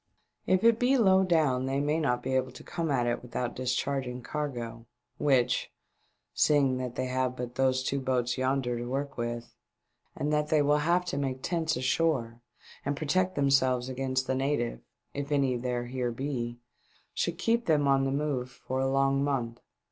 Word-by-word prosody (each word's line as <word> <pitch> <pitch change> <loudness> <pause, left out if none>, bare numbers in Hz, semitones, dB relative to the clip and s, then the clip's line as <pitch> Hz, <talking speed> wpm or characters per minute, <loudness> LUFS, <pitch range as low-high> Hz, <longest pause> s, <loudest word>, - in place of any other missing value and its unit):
If 185 +2 +3
it 230 0 +5
be 255 +2 +3
low 190 -5 +5
down 150 -8 +2
they 135 +1 0
may 150 +3 +1
not 125 -6 0
be 130 - -2
able 130 0 0
to - - -11
come 165 -2 -3
at 125 -4 +1
it 120 0 -1
without 120 0 -4
discharging 130 0 -2
cargo, 120 -6 -4 0.3
which, 130 -4 +2 0.6
seeing 140 -4 +3
that 125 -1 -4
they 130 - -1
have 130 0 -1
but 125 -1 -5
those 130 0 +1
two 140 +1 -1
boats 125 -1 0
yonder 130 -2 0
to 120 - -4
work 140 +1 -3
with, 120 0 -4 0.6
and 150 +2 -1
that 150 0 +1
they 155 -1 +3
will 145 +1 +3
have 175 +4 +2
to 140 -5 -2
make 130 -2 -3
tents 165 -2 0
ashore 130 -3 0 0.4
and 140 0 -2
protect 185 +5 +1
themselves 130 -3 +2
against 130 0 -1
the 130 - 0
natives 130 - -1 0.2
— - - -48
if 140 +1 -4
any 135 -3 +2
there 120 0 -2
here 125 0 -2
be 120 -2 -3 0.3
— - - -36
should 170 -1 -1
keep 230 +5 +1
them 150 -3 +3
on 135 0 +4
the 135 - 0
move 140 -3 -1 0.2
for 130 +1 -1
a 135 0 +1
long 135 0 +2
month. 125 -4 -1
135 Hz, 185 wpm, -29 LUFS, 125-150 Hz, 0.6 s, it